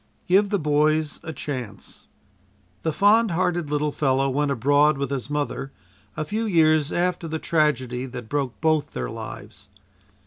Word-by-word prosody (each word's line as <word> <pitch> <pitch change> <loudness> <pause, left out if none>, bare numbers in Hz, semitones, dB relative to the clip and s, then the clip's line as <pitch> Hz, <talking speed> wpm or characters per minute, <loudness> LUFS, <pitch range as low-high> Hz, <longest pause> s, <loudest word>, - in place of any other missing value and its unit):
"GIVE 195 +3 +4
THE 205 - +1
BOYS 150 -1 +1
A 160 - -6
CHANCE" 125 -10 -7 0.7
The 160 - 0
fond 210 +6 +4
hearted 175 -2 0
little 150 0 0
fellow 135 -1 +1
went 145 +2 0
abroad 145 +3 +3
with 140 0 -3
his 135 0 -3
mother 145 -2 -3 0.5
a 155 - -2
few 220 +7 -2
years 155 -5 +3
after 175 -1 -1
the 160 0 -3
tragedy 130 -6 0
that 125 -3 -8
broke 140 -2 -2
both 155 -2 +1
their - - -4
lives. 100 +1 -9
150 Hz, 150 wpm, -24 LUFS, 135-160 Hz, 0.7 s, GIVE